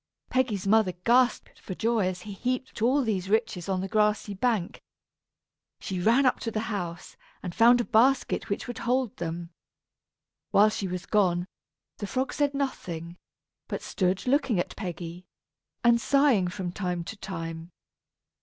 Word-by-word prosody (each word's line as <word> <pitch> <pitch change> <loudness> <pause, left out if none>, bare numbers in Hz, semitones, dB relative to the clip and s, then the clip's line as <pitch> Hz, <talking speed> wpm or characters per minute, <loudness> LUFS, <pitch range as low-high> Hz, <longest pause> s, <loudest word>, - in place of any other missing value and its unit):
Peggy's 230 -7 0
mother 205 -2 +3
gasped 245 +1 +2
for 185 - -7
joy 225 -3 +1
as 185 -1 -4
he 210 -2 -8
heaped 255 +3 -3
all 265 +5 +3
these 195 -5 -1
riches 210 -4 0
on 185 -1 0
the 190 - -3
grassy 210 0 +1
bank. 205 -3 -1 1.0
She 185 -2 -4
ran 235 +9 +4
up 255 - +3
to 230 - -3
the 225 +1 -3
house, 175 -3 -5 0.3
and 180 -3 -4
found 235 +4 +6
a - - +2
basket 250 +3 +2
which 200 - -2
would 245 -2 -6
hold 250 -1 0
them. 170 0 -5 1.0
While 210 +2 +5
she 200 -2 -3
was 180 0 -5
gone, 180 -4 +2 0.5
the 205 - -4
frog 260 +6 -2
said 285 -1 0
nothing, 175 - -4 0.5
but - - -4
stood 185 0 -1
looking 255 - +2
at - - -3
Peggy 175 -2 -6 0.6
and 235 -1 +5
sighing 275 -10 +3
from 180 0 -4
time 180 -2 -3
to 220 - -7
time. 165 -4 -6
205 Hz, 155 wpm, -27 LUFS, 180-240 Hz, 1.0 s, found